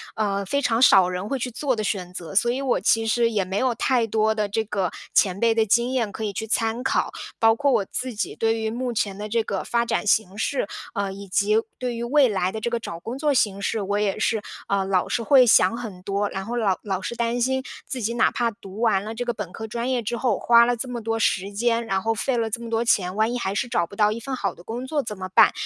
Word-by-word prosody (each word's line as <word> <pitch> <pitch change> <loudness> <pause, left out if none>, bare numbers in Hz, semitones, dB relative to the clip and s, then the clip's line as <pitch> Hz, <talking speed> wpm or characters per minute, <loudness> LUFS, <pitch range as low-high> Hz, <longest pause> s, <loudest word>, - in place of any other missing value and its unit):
呃， 200 -2 -1
非 280 +9 0
常 230 -4 +1
少 195 -7 +6
人 185 +2 -4
会 270 +3 -2
去 250 - -2
做 260 +2 -1
的 215 - -3
选 185 -3 -3
择， 180 +1 -7
所 235 +4 +3
以 260 +3 -2
我 265 -3 +1
其 225 +4 +2
实 230 +1 +2
也 205 -3 +1
没 190 +2 -4
有 255 +2 +1
太 240 +1 +1
多 220 0 +1
的 210 -1 0
这 220 +2 -1
个 195 -5 -1 0.2
前 195 -1 +3
辈 230 -1 +3
的 225 -1 +3
经 235 +4 +2
验 235 -5 0
可 220 - -6
以 210 - -1
去 220 +3 -4
参 225 +2 0
考， 265 - 0 0.3
包 225 -1 +5
括 280 +3 +1
我 200 - +2
自 255 +3 -4
己 210 - -3
对 225 0 0
于 220 0 -1
目 245 +2 -3
前 200 -3 -1
的 210 - -5
这 230 +2 +1
个 200 -3 -3
发 235 0 0
展 235 - -1
形 205 -2 +1
势， 235 -1 -1 0.3
呃， 200 -1 -2
以 200 +1 -9
及 205 +3 +2 0.2
对 250 -1 -2
于 230 - -4
未 275 +3 +4
来 190 -3 0
的 220 - -6
这 235 - -1
个 235 0 -1
找 170 -7 -7
工 235 +8 -6
作 295 0 +1
形 205 -6 +1
势， 205 +1 -1
我 200 +1 -1
也 200 -2 0
是， 220 -2 0 0.2
呃， 195 -1 0
老 190 -2 0
是 235 - -1
会 255 +1 +6
想 200 -1 +5
很 215 -7 -7
多， 200 +1 -1
然 195 0 -5
后 235 - -4
老 205 -6 +1
老 195 -3 -2
是 235 - -4
担 235 +1 -1
心 265 +1 +1 0.2
自 255 - -4
己 230 +2 -1
哪 240 - +4
怕 235 -1 -1
读 205 -1 -10
完 210 -5 +2
了 220 - -5
这 245 - -2
个 240 - -1
本 210 -5 -6
科 220 - -6
专 235 +3 -3
业 255 -2 0
之 235 +2 -3
后， 235 -3 +1
花 235 0 +6
了 245 0 +1
这 240 +3 -5
么 240 -1 -4
多 225 +1 -1
时 200 -3 0
间， 230 +2 +1
然 195 -3 -1
后 225 +3 0
费 245 +3 -1
了 225 -1 0
这 230 +2 -4
么 235 - -7
多 230 +1 0
钱， 185 -5 +1
万 220 +3 +1
一 - - -1
还 195 -3 -2
是 205 - -1
找 175 -8 0
不 200 - -12
到 210 0 +3
一 225 - -4
份 265 +3 -4
好 195 -7 -2
的 - - -15
工 240 +5 -5
作 290 +2 -1
怎 210 -5 -6
么 185 0 -6
办， - - +7
225 Hz, 300 characters per minute, -24 LUFS, 200-240 Hz, 0.3 s, 办